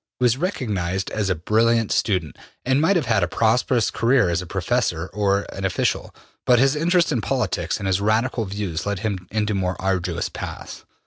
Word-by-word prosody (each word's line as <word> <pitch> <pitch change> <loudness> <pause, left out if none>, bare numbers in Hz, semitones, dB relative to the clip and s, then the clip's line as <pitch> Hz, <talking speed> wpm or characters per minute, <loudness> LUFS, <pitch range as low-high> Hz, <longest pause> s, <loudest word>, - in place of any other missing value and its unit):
He - - -1
was 120 -1 +4
recognized 100 - -2
as 105 -3 -1
a 95 - +1
brilliant 115 +6 +2
student, 90 -8 0 0.3
and 130 +3 +2
might 185 +5 +3
have 170 - +1
had 110 -3 +2
a 90 - +1
prosperous 115 +3 +1
career 115 -5 +2
as 85 +1 0
a 90 - -8
professor 95 -2 -1
or 100 -1 +1
an 95 - -6
official, 95 - -1 0.3
but 125 - +4
his 135 +3 +3
interest 170 +2 +2
in 120 - 0
politics 105 -11 -1
and 100 - -6
his 95 0 +1
Radical 110 +3 +1
views 95 -3 -4
led 100 -2 -2
him 100 -4 -3
into 105 0 -1
more 95 -2 -2
arduous 90 -3 -1
paths. - - -8
105 Hz, 190 wpm, -22 LUFS, 95-120 Hz, 0.3 s, was